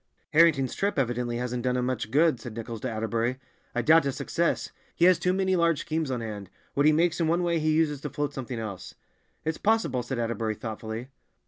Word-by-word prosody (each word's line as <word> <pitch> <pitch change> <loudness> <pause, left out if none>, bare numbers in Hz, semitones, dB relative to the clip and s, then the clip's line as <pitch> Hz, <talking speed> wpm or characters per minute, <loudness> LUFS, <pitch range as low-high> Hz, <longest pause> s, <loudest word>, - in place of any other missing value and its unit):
"Harrington's 150 -5 +4
trip 200 -3 -1
evidently 120 -2 0
hasn't 125 0 -2
done 125 0 0
him 125 - 0
much 125 -4 -2
good," 150 0 +3
said 120 -2 -8
Nichols 115 -1 -6
to 130 - -2
Atterbury. 115 +2 -1 0.4
"I 120 - +1
doubt 160 +4 +6
his 140 -2 -2
success. 170 0 -1 0.2
He 170 - +4
has 185 -1 +6
too 180 - +1
many 190 0 +1
large 170 -3 +2
schemes 160 -2 -2
on 125 -2 -2
hand; 105 -4 -6 0.2
what 145 +1 +3
he - - +7
makes 170 +2 +2
in 165 - +2
one 170 +2 +2
way 170 -1 +1
he 155 0 +1
uses 155 -3 +1
to 150 - -4
float 145 +1 -3
something 130 -3 -5
else." 105 -5 -6 0.5
"It's 160 0 -2
possible," 210 - +1
said 120 +2 -4
Atterbury 115 -2 -1
thoughtfully. 110 +2 -6
130 Hz, 215 wpm, -27 LUFS, 115-160 Hz, 0.5 s, he